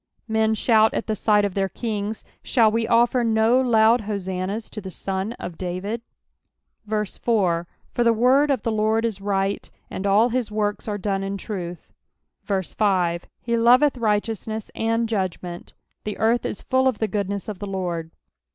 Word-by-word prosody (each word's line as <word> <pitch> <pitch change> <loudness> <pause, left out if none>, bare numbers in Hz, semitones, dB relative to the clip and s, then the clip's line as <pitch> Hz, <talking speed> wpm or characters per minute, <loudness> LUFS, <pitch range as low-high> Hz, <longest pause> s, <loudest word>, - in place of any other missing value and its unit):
Hen 220 0 +2
shout 220 0 +3
at - - -1
the 215 - -1
sight 210 0 +3
of 200 - -2
tlieir 195 -1 -1
kings: 215 -2 -3 0.2
shall 225 -4 +3
we 225 0 0
oSer 240 +1 +3
no 225 +2 +3
loud 230 -1 +4
hosannahs 195 +1 -3
to 215 - -6
the 190 - -7
Son 190 +3 -3
of 175 -7 -8
David 185 +5 -3 0.9
1 210 0 0
4 180 -6 0 0.3
For 240 - +1
the 235 - +5
word 255 +6 +4
of 275 - +1
the 230 - 0
Lord 220 +1 +1
is 210 -4 -3
right; 195 0 -1 0.2
and 195 - -3
all 210 +5 +4
his 245 -2 -1
works 210 0 -2
are 205 -1 -2
done 195 -1 -1
in 195 0 -3
truth. 180 -4 -6 0.5
5 190 -3 0 0.2
He 235 0 0
loveth 250 +5 +5
righteousness 220 -1 -2
and 225 +1 0
judgment: 185 -4 -4 0.3
the 210 - -4
earth 230 +2 +2
is - - -6
full 260 0 +2
of 255 -5 +1
the 220 - 0
goodness 200 -1 -3
of 205 -4 -5
the 205 - -5
Lord. 175 -4 -3
215 Hz, 170 wpm, -23 LUFS, 195-230 Hz, 0.9 s, the